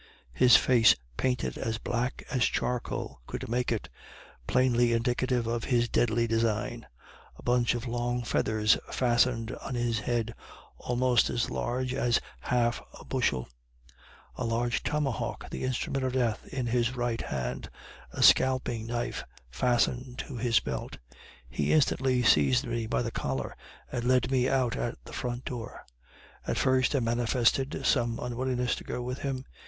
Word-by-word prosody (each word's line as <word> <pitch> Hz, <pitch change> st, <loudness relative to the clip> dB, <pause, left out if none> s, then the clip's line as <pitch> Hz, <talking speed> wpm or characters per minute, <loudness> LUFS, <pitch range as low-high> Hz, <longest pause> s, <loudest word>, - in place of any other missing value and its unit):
His 125 Hz, -, +6 dB
face 120 Hz, -3 st, +5 dB, 0.2 s
painted 125 Hz, -, -1 dB
as 110 Hz, 0 st, -2 dB
black 120 Hz, +3 st, -2 dB
as 125 Hz, -, +2 dB
charcoal 115 Hz, -, -2 dB
could -, -, -5 dB
make 125 Hz, +2 st, 0 dB
it, 115 Hz, -, -2 dB, 0.6 s
plainly 120 Hz, -2 st, +3 dB
indictive 120 Hz, +1 st, 0 dB
of 115 Hz, 0 st, -2 dB
his 120 Hz, -2 st, +2 dB
deadly 115 Hz, 0 st, +2 dB
design; 115 Hz, 0 st, -1 dB, 0.5 s
a -, -, -15 dB
bunch 120 Hz, -1 st, +2 dB
of 120 Hz, +1 st, -4 dB
long 120 Hz, +1 st, -1 dB
feathers 110 Hz, -2 st, +2 dB
fastened 120 Hz, -2 st, +1 dB
on 125 Hz, -, -6 dB
his 120 Hz, -2 st, 0 dB
head, 115 Hz, +1 st, -1 dB, 0.5 s
almost 125 Hz, -1 st, +2 dB
as 120 Hz, -, -1 dB
large 125 Hz, +1 st, -2 dB
as 120 Hz, -3 st, +2 dB
a -, -, -4 dB, 0.3 s
half 120 Hz, -1 st, +2 dB, 0.3 s
bushel; 95 Hz, -, 0 dB, 0.9 s
a -, -, -4 dB
large 120 Hz, +1 st, 0 dB
tomahawk, 150 Hz, -5 st, -2 dB
the -, -, -4 dB
instrument 130 Hz, +1 st, -1 dB
of 130 Hz, -1 st, -1 dB
death, 120 Hz, -4 st, 0 dB
in 130 Hz, -2 st, -3 dB
his 120 Hz, +1 st, +1 dB
right 120 Hz, -2 st, -1 dB
hand; 65 Hz, -2 st, -4 dB, 0.4 s
a -, -, -1 dB
scalping 125 Hz, -3 st, +4 dB
knife 120 Hz, 0 st, -3 dB, 0.3 s
fastened 125 Hz, -, 0 dB
to 140 Hz, -, -8 dB
his 115 Hz, 0 st, +3 dB
belt. 65 Hz, -2 st, -5 dB, 0.5 s
He 70 Hz, +3 st, -1 dB
instanly 130 Hz, -4 st, +2 dB
seized 70 Hz, -, +4 dB
me 115 Hz, -1 st, -2 dB
by 120 Hz, -, 0 dB
the 115 Hz, -, -3 dB
collar, 65 Hz, -, -3 dB, 0.4 s
and 120 Hz, -, -2 dB
led 130 Hz, 0 st, +2 dB
me 130 Hz, -1 st, +2 dB
out 130 Hz, -3 st, +1 dB
at 120 Hz, -, -3 dB
the -, -, -11 dB
front 120 Hz, 0 st, -4 dB
door. 120 Hz, -3 st, -6 dB, 0.6 s
At -, -, -1 dB
first 130 Hz, +1 st, +2 dB
I 135 Hz, -, +2 dB
manifested 120 Hz, +3 st, +1 dB
some 115 Hz, -1 st, +2 dB
unwillingness 125 Hz, 0 st, -1 dB
to -, -, -8 dB
go 125 Hz, -, -4 dB
with 125 Hz, +2 st, -4 dB
him. 135 Hz, -2 st, -3 dB
120 Hz, 150 wpm, -29 LUFS, 115-125 Hz, 0.9 s, His